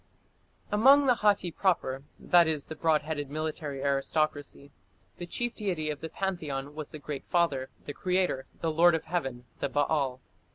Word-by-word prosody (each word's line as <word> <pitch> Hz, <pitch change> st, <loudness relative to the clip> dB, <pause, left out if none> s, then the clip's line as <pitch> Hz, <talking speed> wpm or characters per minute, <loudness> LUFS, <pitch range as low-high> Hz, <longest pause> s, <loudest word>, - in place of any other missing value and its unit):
Among 270 Hz, +7 st, +6 dB
the 255 Hz, -, +5 dB
Hatti 205 Hz, -6 st, +2 dB
proper 160 Hz, -8 st, 0 dB, 0.2 s
that 175 Hz, -2 st, +4 dB
is, 155 Hz, -3 st, -1 dB
the 160 Hz, -, -7 dB
broad 155 Hz, -1 st, +2 dB
headed 145 Hz, -2 st, -4 dB
military 150 Hz, -2 st, -4 dB
aristocracy 140 Hz, 0 st, -1 dB, 0.5 s
the 175 Hz, -, -5 dB
chief 240 Hz, +6 st, -3 dB
deity 175 Hz, -8 st, -2 dB
of 145 Hz, -, -7 dB
the 160 Hz, -, -5 dB
pantheon 150 Hz, -7 st, -3 dB
was 155 Hz, -1 st, -6 dB
the -, -, -8 dB
Great 145 Hz, -1 st, -6 dB
Father, 145 Hz, -7 st, +1 dB, 0.2 s
the 145 Hz, -, -5 dB
creator, 180 Hz, -6 st, 0 dB
"the 165 Hz, -, 0 dB
lord 170 Hz, +2 st, +5 dB
of 160 Hz, -, -2 dB
Heaven", 135 Hz, -8 st, -3 dB
the 140 Hz, -, -1 dB
Baal. 140 Hz, -3 st, 0 dB
155 Hz, 165 wpm, -29 LUFS, 140-175 Hz, 0.5 s, Among